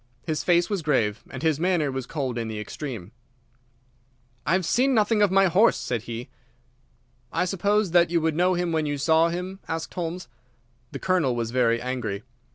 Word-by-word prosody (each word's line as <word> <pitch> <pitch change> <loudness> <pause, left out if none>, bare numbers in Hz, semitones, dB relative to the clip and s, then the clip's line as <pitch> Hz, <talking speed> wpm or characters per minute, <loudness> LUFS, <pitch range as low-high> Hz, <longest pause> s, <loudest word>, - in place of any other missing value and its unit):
His 155 -1 -2
face 175 -1 +3
was 200 -4 -2
grave, 115 -8 0
and - - -7
his 160 -2 +2
manner 170 -5 +1
was 130 -1 -4
cold 130 -6 -3
in 115 - -3
the 110 -1 -5
extreme. 105 -3 -6 1.4
"I - - +3
have 185 -2 +1
seen 260 - +2
nothing 215 0 +3
of 205 - +5
my 195 +1 +4
horse," 190 +5 +4
said 120 -3 -2
he. 120 +3 -5 1.0
"I - - 0
suppose 200 +1 +1
that 175 -1 +5
you 170 0 +2
would 160 -1 0
know 180 +2 +3
him 175 -1 -1
when 160 -2 0
you 145 0 -2
saw 160 +3 +3
him?" 180 +3 -5
asked 160 0 -4
Holmes. 175 0 -4 0.6
The - - -5
Colonel 175 -9 +1
was 115 -1 -2
very 120 -2 +2
angry. 120 -5 -3
160 Hz, 185 wpm, -25 LUFS, 125-180 Hz, 1.4 s, of